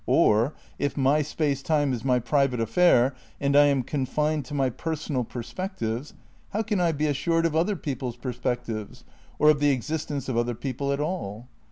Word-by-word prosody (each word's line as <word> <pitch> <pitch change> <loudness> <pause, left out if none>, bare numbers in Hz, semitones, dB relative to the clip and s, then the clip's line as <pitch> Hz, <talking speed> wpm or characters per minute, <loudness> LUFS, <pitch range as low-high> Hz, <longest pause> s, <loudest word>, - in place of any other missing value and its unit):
Or, 115 +8 +3 0.2
if 145 - -1
my 140 +3 +3
space 145 -2 -1
time 145 -2 +1
is 120 - -4
my 130 -2 +3
private 130 0 +1
affair 125 +2 +4 0.3
and 140 0 +1
I 145 0 +7
am 140 -3 +2
confined 150 +2 -1
to 145 - -6
my 135 -2 +1
personal 150 -2 -2
perspectives, 120 - -5 0.4
how 215 +2 0
can 210 -3 -1
I 170 -1 +3
be 150 0 -1
assured 165 +3 +1
of 160 -2 0
other 175 +6 +2
people's 130 -7 -4
perspectives, 120 -4 -4 0.3
or 150 - +6
of 150 - 0
the 145 0 +3
exist 145 +4 -1
ence 140 -3 -3
of 130 - -2
other 120 0 0
people 140 +3 -3
at 140 - -1
all? 125 - -4
140 Hz, 185 wpm, -26 LUFS, 125-155 Hz, 0.4 s, I